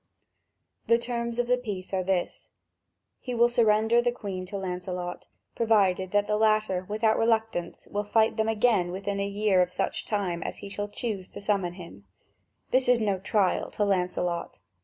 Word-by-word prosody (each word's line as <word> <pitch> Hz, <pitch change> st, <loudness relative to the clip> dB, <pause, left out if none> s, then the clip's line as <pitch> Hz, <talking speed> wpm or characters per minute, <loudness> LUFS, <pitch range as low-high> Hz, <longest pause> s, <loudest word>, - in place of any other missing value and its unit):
The 230 Hz, -, +5 dB
terms 235 Hz, 0 st, -3 dB
of 245 Hz, -, +1 dB
the 250 Hz, +1 st, +2 dB
peace 200 Hz, -6 st, -6 dB
are 185 Hz, -1 st, +1 dB
these: 180 Hz, -1 st, -2 dB, 0.7 s
he 250 Hz, -2 st, -5 dB
will 235 Hz, +1 st, +5 dB
surrender 225 Hz, 0 st, +3 dB
the 245 Hz, 0 st, +1 dB
Queen 195 Hz, -6 st, -6 dB
to 200 Hz, +2 st, -5 dB
Lancelot, 180 Hz, -1 st, -5 dB, 0.3 s
provided 195 Hz, -5 st, +2 dB
that 205 Hz, +1 st, +2 dB
the 210 Hz, 0 st, 0 dB
latter 215 Hz, -4 st, +1 dB
without 220 Hz, +1 st, +2 dB
reluctance 225 Hz, -6 st, 0 dB
will 205 Hz, 0 st, -2 dB
fight 220 Hz, +1 st, +2 dB
them 220 Hz, 0 st, 0 dB
again 215 Hz, -5 st, +2 dB
within 200 Hz, +2 st, -3 dB
a 200 Hz, -, 0 dB
year 200 Hz, -2 st, +2 dB
of 180 Hz, 0 st, 0 dB
such 180 Hz, -, -2 dB
time 190 Hz, -5 st, -1 dB
as -, -, -5 dB
he 200 Hz, -, -8 dB
shall 205 Hz, +1 st, -4 dB
choose 205 Hz, -4 st, -4 dB
to -, -, -9 dB
summon 200 Hz, -4 st, 0 dB
him: 175 Hz, -2 st, -12 dB, 0.7 s
this 255 Hz, 0 st, +3 dB
is 250 Hz, -1 st, +5 dB
no 200 Hz, -4 st, 0 dB
trial 195 Hz, 0 st, +1 dB
to 210 Hz, -, -1 dB
Lancelot. 180 Hz, -, -1 dB
205 Hz, 175 wpm, -27 LUFS, 185-225 Hz, 0.7 s, The